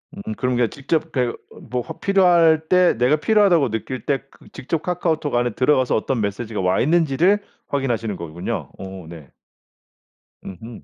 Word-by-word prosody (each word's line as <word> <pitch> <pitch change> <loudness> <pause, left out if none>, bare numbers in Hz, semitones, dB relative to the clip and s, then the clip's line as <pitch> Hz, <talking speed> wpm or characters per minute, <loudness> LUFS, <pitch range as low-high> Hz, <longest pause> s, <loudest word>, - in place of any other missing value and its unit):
음 210 +3 -6
그런 125 -5 -1
게 120 -2 +2
직접 155 +3 -2
그러니까 125 -4 -1
요 - - -17 0.3
뭐 125 0 -2 0.2
필요할 170 -5 +4
때 180 -1 +5
내가 125 +5 +3
필요하다고 175 - +3
느낄 115 +4 -5
때 140 -2 0
그 - - -20
직접 150 +4 -3
카카오톡 160 -6 -1
안에 120 0 +1
들어가서 130 0 +2
어떤 115 +1 -1
메시지가 105 +1 -3
와 90 +1 +1
있는지를 170 +5 +3 0.3
확인하시는 120 -7 -2
거군요. 85 0 -5
어 95 -2 -8
네. 80 -6 -11 1.2
음음. 110 +5 -10
135 Hz, 345 characters per minute, -21 LUFS, 115-165 Hz, 1.2 s, 때